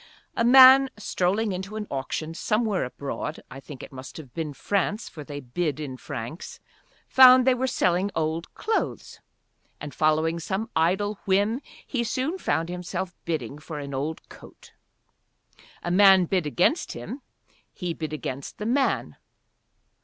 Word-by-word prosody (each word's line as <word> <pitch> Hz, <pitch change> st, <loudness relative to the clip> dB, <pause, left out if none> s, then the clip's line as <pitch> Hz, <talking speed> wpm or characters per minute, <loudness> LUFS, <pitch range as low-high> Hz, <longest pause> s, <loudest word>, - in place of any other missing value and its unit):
A -, -, +1 dB
man 265 Hz, +2 st, +8 dB
strolling 205 Hz, +1 st, 0 dB
into 190 Hz, +3 st, -5 dB
an 215 Hz, -1 st, -4 dB
auction 140 Hz, +4 st, -3 dB
somewhere 215 Hz, -, 0 dB
abroad, 140 Hz, +4 st, -5 dB
I 135 Hz, -, -8 dB
think 135 Hz, -1 st, -10 dB
it -, -, -10 dB
must 130 Hz, -1 st, -10 dB
have 140 Hz, -6 st, -11 dB
been 160 Hz, -3 st, -3 dB
France, 200 Hz, +7 st, -1 dB
for 155 Hz, -, -9 dB
they 145 Hz, 0 st, -7 dB
bid 145 Hz, +3 st, -3 dB
in 140 Hz, -4 st, -5 dB
francs, 130 Hz, +3 st, -7 dB, 0.5 s
found 255 Hz, -1 st, +8 dB
they 260 Hz, -, +5 dB
were 255 Hz, +1 st, -1 dB
selling 185 Hz, -5 st, +1 dB
old 160 Hz, +1 st, -2 dB
clothes. 440 Hz, 0 st, -3 dB, 0.6 s
And 145 Hz, -2 st, -7 dB
following 160 Hz, +3 st, +1 dB
some 190 Hz, +6 st, -3 dB
idle 195 Hz, +6 st, +1 dB
whim 205 Hz, +6 st, +1 dB, 0.2 s
he 245 Hz, -3 st, -2 dB
soon 265 Hz, +10 st, -2 dB
found 160 Hz, -, 0 dB
himself 180 Hz, +1 st, -5 dB
bidding 155 Hz, -3 st, -3 dB
for 155 Hz, 0 st, -8 dB
an 140 Hz, -1 st, -6 dB
old 145 Hz, +4 st, -4 dB
coat. -, -, -15 dB, 1.1 s
A 175 Hz, -, -2 dB
man 190 Hz, -1 st, +6 dB
bid 180 Hz, -3 st, 0 dB
against 180 Hz, -, +1 dB
him, 270 Hz, -, -7 dB, 0.5 s
he 180 Hz, -4 st, -4 dB
bid 155 Hz, -1 st, -5 dB
against 140 Hz, -3 st, -6 dB
the 210 Hz, -, -5 dB
man. 265 Hz, +4 st, 0 dB
175 Hz, 150 wpm, -25 LUFS, 150-215 Hz, 1.1 s, man